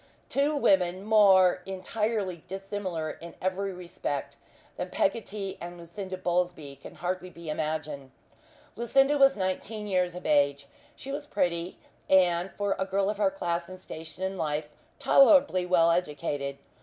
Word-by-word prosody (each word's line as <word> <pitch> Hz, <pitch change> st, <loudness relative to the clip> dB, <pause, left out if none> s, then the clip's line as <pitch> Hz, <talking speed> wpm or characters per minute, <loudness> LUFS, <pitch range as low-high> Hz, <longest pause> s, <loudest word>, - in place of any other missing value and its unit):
Two 285 Hz, +2 st, +1 dB
women 185 Hz, -8 st, +2 dB
more 195 Hz, -4 st, +5 dB
entirely 195 Hz, -1 st, -2 dB
dissimilar, 190 Hz, -4 st, -4 dB
in 170 Hz, 0 st, -9 dB
every 190 Hz, +1 st, -1 dB
respect, 175 Hz, -6 st, -5 dB, 0.4 s
than 180 Hz, -, -4 dB
Peggotty 200 Hz, -1 st, -2 dB
and 175 Hz, 0 st, -7 dB
Lucinda 185 Hz, +3 st, -7 dB
Bowlsby 175 Hz, -6 st, -2 dB
can -, -, -12 dB
hardly 185 Hz, +1 st, -3 dB
be 170 Hz, -2 st, -7 dB
imagined. 155 Hz, -3 st, -3 dB, 0.7 s
Lucinda 270 Hz, +5 st, +3 dB
was 275 Hz, -2 st, +6 dB
nineteen 200 Hz, +3 st, -3 dB
years 180 Hz, -3 st, 0 dB
of 180 Hz, -, -8 dB
age. 140 Hz, -1 st, +2 dB, 0.3 s
She 275 Hz, -, -8 dB
was 290 Hz, +1 st, -5 dB
pretty, 175 Hz, -, -1 dB, 0.3 s
and, 180 Hz, -1 st, +4 dB
for 205 Hz, -1 st, 0 dB
a 190 Hz, -, +1 dB
girl 195 Hz, +1 st, +1 dB
of 210 Hz, -, -7 dB
her 285 Hz, -, +4 dB
class 175 Hz, -12 st, -3 dB
and 185 Hz, 0 st, -9 dB
station 165 Hz, +1 st, -8 dB
in 190 Hz, 0 st, -3 dB
life, 150 Hz, -1 st, -2 dB, 0.3 s
tolerably 275 Hz, -, +5 dB
well 170 Hz, -2 st, +4 dB
educated. 145 Hz, -4 st, -2 dB
185 Hz, 145 wpm, -28 LUFS, 170-200 Hz, 0.7 s, was